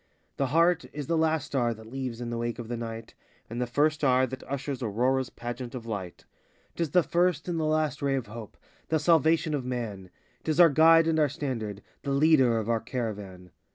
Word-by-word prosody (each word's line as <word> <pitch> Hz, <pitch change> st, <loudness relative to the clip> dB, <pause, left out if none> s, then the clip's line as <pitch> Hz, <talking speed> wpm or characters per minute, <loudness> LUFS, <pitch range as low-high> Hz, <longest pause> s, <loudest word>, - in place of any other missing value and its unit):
The 135 Hz, -, +1 dB
heart 170 Hz, +5 st, +3 dB
is 145 Hz, -1 st, -5 dB
the 165 Hz, -, 0 dB
last 160 Hz, -2 st, +1 dB
star 120 Hz, -5 st, 0 dB
that 110 Hz, 0 st, -13 dB
leaves 130 Hz, -3 st, -4 dB
in 120 Hz, -1 st, -4 dB
the 120 Hz, -, -2 dB
wake 120 Hz, 0 st, -2 dB
of 115 Hz, -2 st, -7 dB
the 120 Hz, -, -2 dB
Night, 115 Hz, -1 st, -6 dB, 0.4 s
And 120 Hz, +2 st, -3 dB
the 125 Hz, -, -1 dB
first 150 Hz, +5 st, +2 dB
star 130 Hz, -2 st, +3 dB
that 130 Hz, +1 st, -7 dB
ushers 140 Hz, -1 st, -3 dB
Aurora's 125 Hz, +4 st, 0 dB
pageant 120 Hz, +1 st, -6 dB
of 120 Hz, -2 st, -7 dB
light; 100 Hz, -6 st, -6 dB, 0.5 s
'T -, -, -5 dB
is 165 Hz, -, 0 dB
the 180 Hz, +2 st, +4 dB
first 175 Hz, +1 st, +1 dB
and 170 Hz, -2 st, -1 dB
the 155 Hz, -, 0 dB
last 155 Hz, -1 st, 0 dB
ray 140 Hz, -1 st, +1 dB
of 130 Hz, -3 st, -2 dB
hope, 110 Hz, 0 st, -10 dB, 0.3 s
the 160 Hz, -, +2 dB
salvation 160 Hz, 0 st, +3 dB
of 140 Hz, -3 st, -1 dB
man; 115 Hz, -7 st, -5 dB, 0.3 s
'T -, -, -4 dB
is 155 Hz, +2 st, 0 dB
our 170 Hz, -2 st, +9 dB
guide 165 Hz, +2 st, +6 dB
and 160 Hz, -1 st, +1 dB
our 150 Hz, -2 st, +3 dB
standard—the 125 Hz, -3 st, -5 dB
leader 140 Hz, -4 st, +4 dB
of 110 Hz, -1 st, -2 dB
our 115 Hz, -1 st, +1 dB
caravan. 105 Hz, -7 st, -5 dB
130 Hz, 215 wpm, -28 LUFS, 115-155 Hz, 0.5 s, our